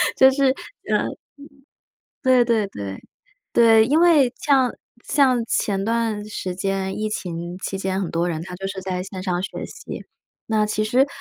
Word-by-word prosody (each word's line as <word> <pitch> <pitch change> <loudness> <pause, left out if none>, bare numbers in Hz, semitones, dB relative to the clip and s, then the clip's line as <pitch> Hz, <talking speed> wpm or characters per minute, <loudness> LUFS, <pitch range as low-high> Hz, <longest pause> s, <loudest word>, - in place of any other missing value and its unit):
就 265 0 +7
是 270 -1 +3 0.4
呃， - - +4
嗯， - - -7 1.0
对 255 -2 +4
对 225 -4 +1
对。 100 - -7 0.5
对， 225 -1 +6
因 305 +4 +3
为 305 -8 +5
像 270 -5 +3 0.3
像 255 -5 +3
前 195 -3 0
段 225 -2 0
时 185 -3 -4
间， 195 0 -2
疫 215 0 -1
情 175 -3 -5
期 195 - -4
间， 190 0 -1
很 185 - -3
多 170 +1 0
人 160 -1 -3
他 180 0 -9
就 195 +1 -5
是 195 0 -5
在 185 -1 -2
线 185 0 -7
上 180 -2 -1
学 190 - -5
习。 455 - -9 0.4
那 220 -1 +1
其 215 0 -1
实 250 +6 +3
210 Hz, 180 characters per minute, -22 LUFS, 185-245 Hz, 1.0 s, 就